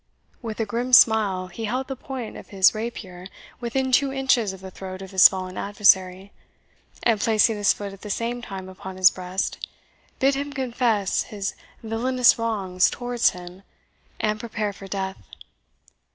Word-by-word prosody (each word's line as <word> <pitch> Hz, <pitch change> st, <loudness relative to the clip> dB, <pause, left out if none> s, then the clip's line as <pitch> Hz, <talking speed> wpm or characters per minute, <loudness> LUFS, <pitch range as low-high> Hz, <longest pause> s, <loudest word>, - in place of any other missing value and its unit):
With 225 Hz, -3 st, -6 dB
a 225 Hz, -, 0 dB
grim 240 Hz, +4 st, -3 dB
smile 210 Hz, -6 st, +5 dB
he 185 Hz, +5 st, -6 dB
held 255 Hz, +5 st, -2 dB
the 270 Hz, -, -4 dB
point 255 Hz, -3 st, -7 dB
of -, -, -10 dB
his 195 Hz, -2 st, +4 dB
rapier 205 Hz, -5 st, -6 dB, 0.3 s
within 260 Hz, +2 st, -2 dB
two 270 Hz, +2 st, +3 dB
inches 265 Hz, -6 st, +1 dB
of 190 Hz, -, -10 dB
the 190 Hz, 0 st, -10 dB
throat 185 Hz, 0 st, -8 dB
of 190 Hz, -, -10 dB
his 190 Hz, -1 st, +9 dB
fallen 185 Hz, -1 st, -6 dB
adversary, 195 Hz, -2 st, +2 dB, 0.7 s
and 225 Hz, -3 st, +2 dB
placing 220 Hz, 0 st, +3 dB
his 205 Hz, -1 st, +3 dB
foot 200 Hz, -1 st, -5 dB
at 195 Hz, -, -14 dB
the 210 Hz, -, -8 dB
same 235 Hz, +4 st, -2 dB
time 190 Hz, -5 st, -7 dB
upon 190 Hz, 0 st, -9 dB
his 185 Hz, 0 st, +6 dB
breast, 185 Hz, +1 st, -4 dB, 0.5 s
bid 270 Hz, +1 st, +3 dB
him 285 Hz, +1 st, -4 dB
confess 235 Hz, -6 st, 0 dB
his 200 Hz, -2 st, -4 dB, 0.3 s
villainous 240 Hz, +3 st, +2 dB
wrongs 195 Hz, -5 st, +1 dB
towards 245 Hz, -1 st, +1 dB
him, 180 Hz, +1 st, -11 dB, 0.6 s
and 215 Hz, 0 st, -1 dB
prepare 220 Hz, -2 st, -3 dB
for 195 Hz, 0 st, -11 dB
death. 190 Hz, -1 st, -4 dB
210 Hz, 165 wpm, -24 LUFS, 190-240 Hz, 0.7 s, his